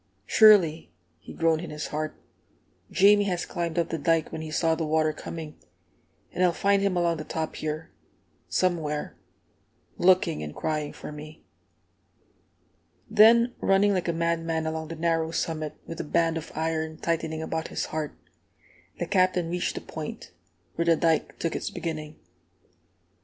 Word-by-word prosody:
"Surely," 180 - +5 0.3
he - - -12
groaned 165 -1 +1
in 175 - -7
his 150 0 -5
heart, 155 0 -4 0.7
"Jamie 205 +1 +5
has 180 -3 -1
climbed 170 -2 -3
up 170 - +1
the 165 - -3
dike 165 +2 +1
when 160 - -5
he 160 - -6
saw 160 +1 +1
the 160 0 -2
water 155 0 +1
coming, 155 0 -8 0.7
and 180 - 0
I'll 180 -1 +4
find 200 +2 +2
him 195 -2 +1
along 170 -1 +1
the 155 - -5
top 160 0 -4
here, 155 +1 -4 0.6
somewhere, 160 -5 -1 0.8
looking 180 - +3
and 75 0 -6
crying 155 -2 -2
for - - -9
me!" 150 +1 -10 1.7
Then, 230 +3 +6
running 200 +1 +3
like 185 -2 -1
a - - +2
madman 165 -1 -1
along 160 0 -3
the 165 - -6
narrow 165 0 0
summit, 160 -2 -3
with 165 - -7
a - - -2
band 165 +1 +1
of 160 - -6
iron 160 0 -2
tightening 160 -1 -2
about 160 0 -3
his - - -3
heart, 155 -1 -4 0.8
the - - -2
Captain 185 -3 +2
reached 180 0 -1
the - - -4
Point, - - -7 0.4
where 170 - -1
the 170 -1 +5
dike 160 0 +1
took 165 - -2
its - - -3
beginning. 155 -2 -5
165 Hz, 160 wpm, -26 LUFS, 155-175 Hz, 1.7 s, Then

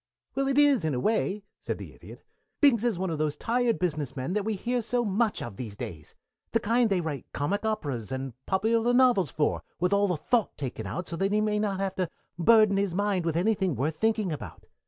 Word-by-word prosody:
"Well, 275 0 0
it 275 0 +1
is, 285 - +5
in 155 -4 0
a - - -1
way," 210 - 0 0.2
said - - -3
the - - -9
Idiot. - - -13 0.4
"Binks 255 -7 +5
is 235 -6 +1
one 185 -1 -2
of 155 - -3
those 155 -1 0
tired 240 0 +1
business 155 -7 -2
men 130 +6 -3
that 210 0 0
we 220 +1 -1
hear 240 +5 -1
so 240 +1 0
much 210 +2 0
of 105 -5 -7
these 110 -5 -6
days. 75 -6 -7 0.4
The 230 - +4
kind 230 +2 +2
they 190 -3 +1
write 155 -4 -5
comic 200 +9 -1
operas 135 - -3
and 130 -1 -4
popular 225 +5 +2
novels 245 - +4
for, 150 - 0 0.2
with 180 +3 +1
all 200 0 +3
the 180 -4 0
thought 230 +8 0
taken 125 -6 -4
out 125 - -4
so 170 - -5
that 195 +2 0
he 210 - +3
may 210 0 +1
not 200 -2 -1
have 195 -1 -1
to 185 -3 0 0.3
burden 215 +2 +5
his 195 -3 0
mind 200 -3 0
with 165 -1 0
anything 190 -3 +1
worth 145 +6 -1
thinking 220 -3 +1
about. 150 - -7
195 Hz, 225 wpm, -28 LUFS, 155-225 Hz, 0.4 s, is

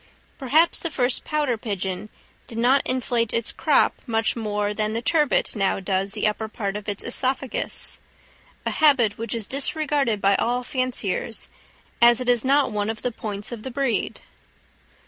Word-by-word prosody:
Perhaps 300 +5 +3
the 335 - -2
first 250 -4 +1
pouter 295 -7 -1
pigeon 195 -2 -4 0.4
did 230 - -8
not 255 +4 +4
inflate 240 -3 0
its 230 -1 0
crop - - +3
much 225 -1 +1
more 210 -2 -1
than 215 0 -1
the 230 - -2
turbit 300 -4 +2
now 195 -2 +1
does 195 +1 -1
the 215 - -1
upper 215 +1 0
part 205 -3 -4
of 210 0 -5
its 205 - -2
œsophagus—a 260 +2 -1 0.7
habit 255 -9 +3
which 230 0 -2
is 225 -3 -1
disregarded 275 -3 0
by 200 0 +3
all 245 +1 0
fanciers, 245 -4 -2 0.5
as 235 0 +7
it 250 -1 -2
is 240 -2 +4
not 275 -1 +3
one 210 0 -1
of 225 -1 -5
the 250 - 0
points 210 -2 -4
of 235 -3 -6
the 260 - -5
breed. 265 -1 -1
230 Hz, 165 wpm, -24 LUFS, 210-260 Hz, 0.7 s, as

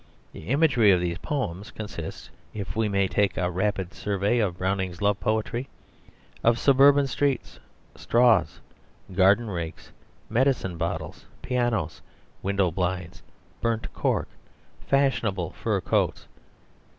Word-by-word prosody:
The 80 - -10
imagery 135 -4 +4
of 90 - +4
these 85 +1 -2
poems 105 - -3
consists, 100 -7 -7 0.2
if 100 -3 -5
we 110 -1 +1
may 100 -1 +2
take 100 0 +1
a 90 0 0
rapid 95 -1 -1
survey 100 +4 0
of 95 -5 0
Browning's 95 -1 -2
love 100 0 +1
poetry, 115 +4 -1 0.7
of 115 0 +4
suburban 140 +2 +5
streets, 135 -2 -1 0.4
straws, 115 - +3 0.5
garden 100 +5 +4
rakes, 85 -5 -6 0.4
medicine 120 -6 +1
bottles, 85 0 -4 0.2
pianos, 120 -10 -1 0.4
window 100 -2 +1
blinds, 90 0 -3 0.4
burnt 115 -1 -1
cork, - - 0 0.6
fashionable 110 -10 +1
fur 105 -2 -1
coats. 90 - 0
100 Hz, 115 wpm, -26 LUFS, 90-120 Hz, 0.7 s, suburban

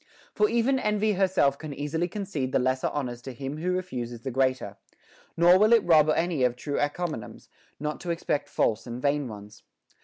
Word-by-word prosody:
For 425 - +2
even 250 +3 +2
envy 210 -2 +1
herself 185 -8 +2
can 150 -3 -7
easily 150 +5 -2
concede 175 -9 -4
the - - +4
lesser 130 +1 +1
honors 125 -4 -4
to 130 +1 -7
him 135 +4 -5
who 180 +3 -1
refuses 125 -11 -4
the 130 - -4
greater; 130 -5 0 0.6
nor 175 +2 +6
will 215 +3 +5
it 230 -3 +5
rob 155 -3 +5
any 165 -3 +1
of 125 -1 +2
true 145 +3 -3
en 145 - +2
comiums, 155 -8 -6 0.3
not 150 +1 -3
to 175 - -7
expect 150 -3 -1
false 110 +1 0
and 120 +1 -5
vain 145 +1 0
ones. 105 -2 -11
145 Hz, 190 wpm, -27 LUFS, 130-180 Hz, 0.6 s, nor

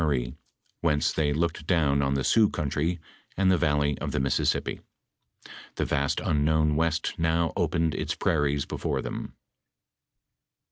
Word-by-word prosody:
Marie, 65 -5 0 0.4
whence 75 -3 +1
they 75 -2 +1
looked 80 +1 -2
down 75 -6 +2
on 70 0 0
the 65 - 0
Sioux 110 - +4
country 75 +4 -2 0.4
and 95 -1 +3
the 90 - +4
valley 75 -3 +1
of - - -3
the - - -1
Mississippi. 65 0 0 0.9
The - - -1
vast 70 -1 0
unknown 75 0 +1
west 80 +1 0
now 80 0 +1
opened 80 -1 0
its - - -2
prairies 70 -1 0
before - - -3
them. - - -6
75 Hz, 140 wpm, -27 LUFS, 70-80 Hz, 0.9 s, Sioux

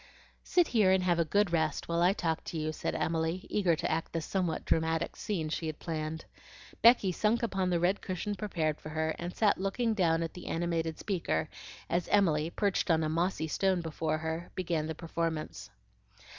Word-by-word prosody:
"Sit 350 -3 +2
here 215 -5 +4
and 190 0 +4
have 175 -2 +2
a - - +5
good 200 +2 +2
rest, 155 -3 0
while 170 0 0
I 180 +2 +5
talk 165 -5 -1
to 165 - -4
you," 155 0 -1
said - - -3
Emily, 165 +3 -1
eager 185 -5 +3
to - - -2
act 160 +1 -2
the 165 - 0
somewhat 175 0 -2
dramatic 160 +1 0
scene 175 -7 -2
she 160 +1 -3
had 155 -1 -4
planned. 160 -1 -4 0.6
Becky 230 -5 +6
sunk 215 +6 +1
upon 195 -5 0
the 175 -1 +2
red 180 +4 +1
cushion 190 +2 -3
prepared 170 -7 -2
for 155 - -7
her, 160 0 -1
and 175 +1 -5
sat 210 -4 +3
looking 220 +4 0
down 165 -5 +2
at 165 - -4
the 180 - -9
animated 165 -1 -1
speaker, 170 - -1 0.4
as 175 0 0
Emily, 165 -6 +3
perched 200 +1 0
on 160 -1 +3
a 155 - 0
mossy 165 0 0
stone 190 +2 +1
before 160 -1 -2
her, 160 +2 -4
began 170 -4 -1
the 160 - -4
performance. 165 -1 -3
170 Hz, 195 wpm, -31 LUFS, 160-190 Hz, 0.6 s, Becky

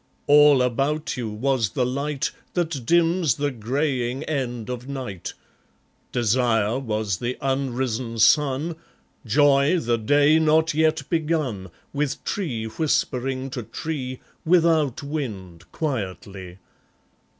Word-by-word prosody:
All 145 -2 +6
about 135 +5 -1
you 120 -4 -3
was 115 +1 0
the 125 0 0
light 140 +2 -2 0.2
That 160 -9 -2
dims 170 -5 +3
the 145 0 -1
greying 130 +2 -2
end 125 -7 -3
of 125 0 -5
night; 125 -10 -5 0.8
Desire 120 -1 +1
was 110 -6 -2
the 120 +6 -3
unrisen 130 -3 -2
sun, 150 +6 +3 0.5
Joy 140 - +4
the 120 -7 0
day 145 +7 +4
not 160 0 +3
yet 155 -2 +1
begun, 150 - -1 0.2
With 145 -1 -2
tree 130 - -3
whispering 130 0 -1
to 125 - -4
tree, 130 +2 -5 0.2
Without 160 -6 +3
wind, 100 - -6
quietly. 95 - -5
135 Hz, 110 wpm, -23 LUFS, 115-150 Hz, 0.8 s, All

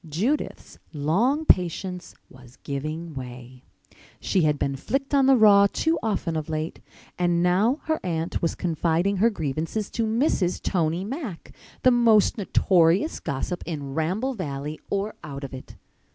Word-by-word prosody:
Judith's 220 - -2
long 210 - +1
patience 180 - +1
was 125 -1 -16
giving 155 +4 -4
way. 125 -1 -9 0.6
She 190 - +1
had 150 -2 +2
been 140 -1 -1
flicked 270 - -3
on 275 -2 +4
the 270 - +7
raw 205 -3 +7
too 325 +1 0
often 195 -6 -1
of 155 0 -3
late. 155 +1 -3 0.4
And 175 -1 +2
now 205 - +2
her 315 0 -1
aunt 165 -2 -2
was 165 - 0
confiding 170 +3 0
her 225 +5 +4
grievances 165 - -3
to 225 -1 -1
Mrs. 220 - +1
Tony 170 0 0
Mack—the 255 - -3
most 230 -4 +4
notorious 185 - +2
gossip 155 +6 -3
in 145 -5 -5
Ramble 185 - -1
Valley 150 - -5
or 200 +2 -1
out 140 -1 -7
of 135 - -7
it! 130 - -10
175 Hz, 145 wpm, -25 LUFS, 155-220 Hz, 0.6 s, the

